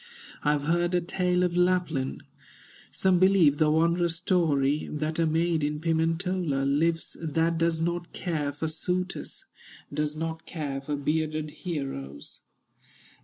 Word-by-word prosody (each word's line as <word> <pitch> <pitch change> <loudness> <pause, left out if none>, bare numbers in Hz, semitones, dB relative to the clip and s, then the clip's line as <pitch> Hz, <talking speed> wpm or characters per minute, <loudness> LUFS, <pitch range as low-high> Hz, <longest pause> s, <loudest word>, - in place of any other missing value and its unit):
"I 150 - +3
have 145 -1 -1
heard 175 +3 +1
a 175 - +3
tale 180 +1 0
of 175 -1 0
Lapland, 180 -7 +1 0.7
Some 185 -2 +2
believe 185 -6 +5
the 155 0 +3
wondrous 170 +2 +2
story, 150 -5 +1
That 155 +2 -2
a 165 - +3
maid 165 0 +1
in 150 +1 -1
Pimentola 165 -2 0
Lives 165 +4 +1
that 165 +1 0
does 165 -1 +1
not 170 +1 -2
care 155 -5 -2
for 145 +3 -3
suitors, 180 +4 -3 0.5
Does 150 0 -1
not 160 +1 -4
care 145 -5 -4
for 145 +2 -3
bearded 155 +1 -1
heroes." 135 - -6
160 Hz, 135 wpm, -27 LUFS, 150-175 Hz, 0.7 s, believe